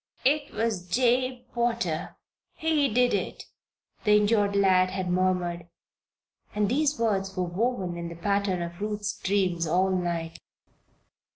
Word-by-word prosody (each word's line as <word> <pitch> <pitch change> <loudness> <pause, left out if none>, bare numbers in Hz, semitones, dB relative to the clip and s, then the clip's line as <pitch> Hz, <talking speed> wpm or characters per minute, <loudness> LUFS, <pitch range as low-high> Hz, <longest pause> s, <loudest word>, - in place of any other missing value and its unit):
"It 290 +2 +2
was 215 -6 -2
Jabe 250 +3 +1
Potter 235 -9 -1 0.4
he 305 -5 +1
did 245 +2 +3
it," - - -2 0.6
the 210 -1 +5
injured 205 -1 +2
lad 185 -2 +4
had 185 -1 -3
murmured, 180 -2 0 0.9
and 210 -1 +2
these 295 +5 +1
words 195 -4 -1
were 185 - +1
woven 185 0 -1
in 170 0 -5
the 170 - -8
pattern 200 0 0
of 170 +2 -8
Ruth's 210 -1 -2
dreams 185 -4 0
all 185 +4 +2
night. 170 -3 -2
200 Hz, 130 wpm, -27 LUFS, 180-230 Hz, 0.9 s, the